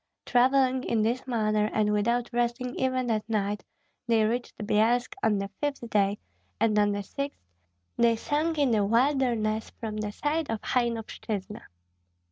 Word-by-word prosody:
Travelling 260 Hz, +1 st, +3 dB
in 220 Hz, -2 st, +1 dB
this 240 Hz, +4 st, -1 dB
manner 215 Hz, -3 st, +1 dB
and 210 Hz, -1 st, +1 dB
without 235 Hz, +3 st, 0 dB
resting 240 Hz, +1 st, -1 dB
even 255 Hz, -2 st, 0 dB
at 215 Hz, 0 st, -2 dB
night, 205 Hz, -1 st, -1 dB, 0.4 s
they 225 Hz, -2 st, +3 dB
reached 240 Hz, +3 st, -2 dB
Byelsk 225 Hz, -, +1 dB
on 210 Hz, -2 st, +2 dB
the 195 Hz, 0 st, -2 dB
fifth 285 Hz, -5 st, -2 dB
day, 200 Hz, 0 st, +2 dB, 0.4 s
and 215 Hz, -1 st, +3 dB
on 205 Hz, 0 st, +3 dB
the 205 Hz, 0 st, -2 dB
sixth 280 Hz, +7 st, -5 dB, 0.6 s
they 235 Hz, -1 st, +4 dB
sank 305 Hz, +7 st, -1 dB
in 280 Hz, -4 st, +3 dB
the 215 Hz, -2 st, +3 dB
wilderness 230 Hz, -2 st, +1 dB
from 215 Hz, -2 st, -4 dB
the 210 Hz, -1 st, -3 dB
side 300 Hz, +6 st, -1 dB
of 225 Hz, -1 st, -1 dB
Hainovshyna. 225 Hz, -3 st, -2 dB
230 Hz, 150 wpm, -27 LUFS, 215-255 Hz, 0.6 s, they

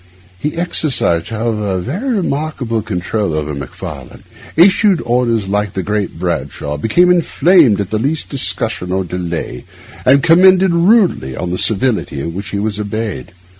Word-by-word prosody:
He 150 Hz, +2 st, -3 dB
exercised, 155 Hz, -, -1 dB
however, 110 Hz, -3 st, -2 dB
a -, -, -1 dB
very 200 Hz, -, -3 dB
remarkable 140 Hz, -, -2 dB
control 100 Hz, -2 st, -2 dB
over 75 Hz, -1 st, -3 dB
Macfarlane; 70 Hz, -3 st, -8 dB, 0.3 s
issued 190 Hz, +2 st, +4 dB
orders 120 Hz, -3 st, 0 dB
like 105 Hz, 0 st, -1 dB
the 95 Hz, -, -3 dB
Great 105 Hz, -3 st, -2 dB
Bashaw; 75 Hz, -4 st, -3 dB
became 175 Hz, -, +3 dB
inflamed 170 Hz, -, +3 dB
at 100 Hz, -1 st, -3 dB
the 110 Hz, -, 0 dB
least 145 Hz, +7 st, -2 dB
discussion 115 Hz, -8 st, -2 dB
or 95 Hz, +1 st, 0 dB
delay, 85 Hz, -2 st, -5 dB, 0.4 s
and 140 Hz, +2 st, +4 dB
commented 185 Hz, +2 st, +5 dB
rudely 175 Hz, -, +2 dB
on 90 Hz, -, -3 dB
the 90 Hz, -, -2 dB
servility 105 Hz, -, +1 dB
with 85 Hz, -, -4 dB
which 100 Hz, +3 st, -6 dB
he 100 Hz, -, -3 dB
was 105 Hz, 0 st, -2 dB
obeyed. 105 Hz, -, -4 dB
110 Hz, 150 wpm, -15 LUFS, -, 0.4 s, commented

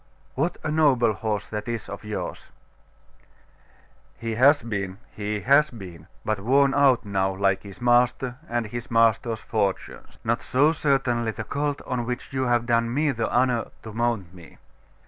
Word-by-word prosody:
What 165 Hz, +6 st, -1 dB
a 155 Hz, -, -2 dB
noble 135 Hz, -8 st, +3 dB
horse 105 Hz, -1 st, -2 dB
that 105 Hz, +1 st, -5 dB
is 115 Hz, -3 st, -4 dB
of 100 Hz, -, -8 dB
yours!' 105 Hz, 0 st, -5 dB, 1.7 s
'He 115 Hz, -1 st, -4 dB
has 140 Hz, +5 st, +5 dB
been 100 Hz, -4 st, -4 dB
he 105 Hz, 0 st, -3 dB
has 140 Hz, +4 st, +4 dB
been; 90 Hz, -8 st, -11 dB, 0.2 s
but 110 Hz, -1 st, 0 dB
worn 135 Hz, +6 st, +3 dB
out 135 Hz, -5 st, +4 dB
now, 95 Hz, -1 st, 0 dB
like 95 Hz, 0 st, +1 dB
his 100 Hz, -1 st, -12 dB
master 125 Hz, +1 st, +2 dB
and 120 Hz, -1 st, -1 dB
his 120 Hz, +4 st, -6 dB
master's 115 Hz, -1 st, +2 dB
fortunes....' 100 Hz, -4 st, -3 dB
'Not 115 Hz, +1 st, 0 dB
so, 145 Hz, +5 st, +3 dB
certainly, 135 Hz, -6 st, +1 dB
the 110 Hz, -, -4 dB
colt 145 Hz, 0 st, -2 dB
on 120 Hz, -2 st, -2 dB
which 125 Hz, +2 st, -5 dB
you 130 Hz, -1 st, 0 dB
have 120 Hz, -1 st, +2 dB
done 115 Hz, -1 st, +1 dB
me 145 Hz, +3 st, +1 dB
the 115 Hz, -3 st, -2 dB
honour 125 Hz, -1 st, +2 dB, 0.2 s
to 110 Hz, -, -8 dB
mount 115 Hz, -6 st, -1 dB
me. 85 Hz, -3 st, -15 dB
115 Hz, 165 wpm, -25 LUFS, 105-130 Hz, 1.7 s, has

